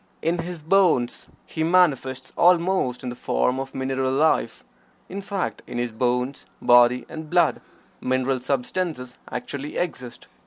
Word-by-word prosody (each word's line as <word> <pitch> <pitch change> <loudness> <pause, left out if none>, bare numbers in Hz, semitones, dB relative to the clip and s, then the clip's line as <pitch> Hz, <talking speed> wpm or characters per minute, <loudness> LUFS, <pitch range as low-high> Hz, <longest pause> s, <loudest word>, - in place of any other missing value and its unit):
In 170 +2 +1
his 170 -2 -5
bones 165 -8 +2 0.2
he 160 - -3
manifests 140 -7 +2
almost 175 -7 +3
in 125 - -3
the 120 - -6
form 125 +1 0
of 135 0 -6
mineral 130 0 -1
life, 155 +4 +1 0.5
in 195 +2 -5
fact, 195 -1 -3
in - - -6
his 120 -1 -1
bones, 125 +3 -1
body 120 +1 +5
and 160 -1 -8
blood 175 -2 +2 0.4
mineral 130 +1 0
substances 125 +1 -3
actually 140 +4 -5
exist. 130 -9 -4
135 Hz, 140 wpm, -24 LUFS, 125-170 Hz, 0.5 s, body